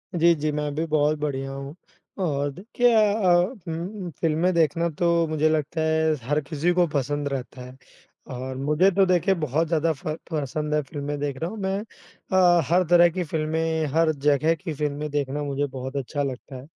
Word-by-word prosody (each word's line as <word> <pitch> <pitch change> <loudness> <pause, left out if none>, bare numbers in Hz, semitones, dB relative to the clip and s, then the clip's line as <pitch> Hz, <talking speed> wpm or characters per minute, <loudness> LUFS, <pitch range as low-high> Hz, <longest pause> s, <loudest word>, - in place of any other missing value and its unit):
जी, 170 0 +5
जी। 150 0 -1
मैं 150 -1 -2
भी 160 +2 -1
बहुत 155 0 +2
बढ़िया 135 -2 -3
हूँ 140 +2 -7 0.5
और 145 +3 -2
क्या 240 -2 +5
अ 195 -4 +3 0.3
उम, 175 +4 -5
फ़िल्में 165 +3 +2
देखना 170 +1 +2
तो 170 -1 +2
मुझे 155 0 +1
लगता 155 +1 -1
है 160 0 +2
हर 145 +2 +2
किसी 155 +4 -1
को 175 0 +3
पसंद 145 +1 -1
रहता 130 -1 -5
है। 125 +1 -10 0.6
और 130 +1 -5
मुझे 150 +7 +3
तो 195 +1 +3
देखिए 185 +1 +2
बहुत 155 +3 0
ज़्यादा 165 0 +1
फ़ 140 - -11 0.2
पसंद 150 0 -2
है 150 - +2
फ़िल्में 145 +1 -5
देखना 145 +3 -3
मैं 195 -2 -2
अ, 185 -4 +1
हर 180 +2 +4
तरह 175 0 +7
की 180 +2 -3
फ़िल्में, 160 0 -1
हर 165 0 +3 0.2
जगह 150 +3 +3
की 165 -1 -6
फ़िल्में 150 0 -3
देखना 145 0 -2
मुझे 140 0 -1
बहुत 130 0 -7
अच्छा 145 +2 -2
लगता 135 0 -6
है। 130 +1 -9
155 Hz, 180 wpm, -24 LUFS, 145-170 Hz, 0.6 s, तरह